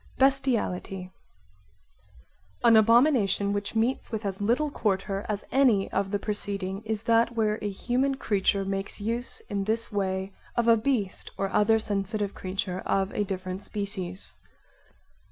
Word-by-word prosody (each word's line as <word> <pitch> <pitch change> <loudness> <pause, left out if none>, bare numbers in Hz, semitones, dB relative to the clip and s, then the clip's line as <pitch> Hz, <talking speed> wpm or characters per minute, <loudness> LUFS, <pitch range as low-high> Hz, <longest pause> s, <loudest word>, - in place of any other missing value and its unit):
Bestiality 235 -9 0 1.5
An 235 -1 +7
abomination 220 -3 +4
which 205 +2 -3
meets 235 +4 0
with 220 -1 -3
as 195 0 -3
little 250 +8 +1
quarter 195 -4 -1
as 210 -1 -2
any 245 -8 +3
of 195 - 0
the 205 - 0
preceding 200 -2 -2
is 220 -1 -2
that 230 +1 +3
where 215 -1 +1
a 210 - -1
human 255 +7 0
creature 200 -5 +1
makes 195 +1 -2
use 235 +4 -3
in 200 -1 -2
this 225 +2 0
way 190 -1 -2 0.2
of 235 -1 +2
a 230 - +7
beast 220 -4 -1
or 195 0 -1
other 210 +2 +4
sensitive 205 -1 -2
creature 185 0 -4
of 195 0 0
a 210 - 0
different 185 -1 -4
species. 200 -3 -2
205 Hz, 140 wpm, -27 LUFS, 195-230 Hz, 1.5 s, An